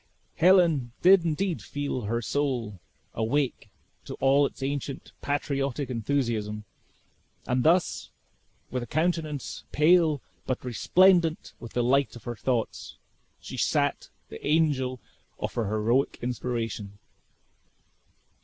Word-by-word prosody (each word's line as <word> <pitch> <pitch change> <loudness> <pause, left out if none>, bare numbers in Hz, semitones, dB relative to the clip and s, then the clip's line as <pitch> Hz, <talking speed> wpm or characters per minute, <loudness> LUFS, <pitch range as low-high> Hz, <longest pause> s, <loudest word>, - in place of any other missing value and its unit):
Helen 165 -8 +4
did 185 0 +7
indeed 170 +2 -1
feel 140 -5 -4
her 115 +3 -1
soul 120 -8 -2 0.3
awake 125 +5 -1 0.4
to - - -6
all 140 +1 +4
its 135 - -10
ancient 140 0 -4
patriotic 140 -2 -2
enthusiasm; 115 -4 -1 0.8
and 125 0 0
thus, 170 +2 +2 0.6
with 125 - -2
a 120 - -6
countenance 155 -1 -2
pale, 155 -1 +4 0.3
but 130 -1 -2
resplendent 170 - +3
with 115 - -10
the 120 - +1
light 135 +2 +2
of 120 - -11
her 120 - -5
thoughts, 120 0 -2 0.4
she - - -8
sat - - 0 0.2
the 75 - -10
angel 145 -5 +1 0.4
of - - -4
her 115 - -1
heroic 110 +6 +1
inspiration. 115 -4 -3
135 Hz, 115 wpm, -27 LUFS, 120-155 Hz, 0.8 s, did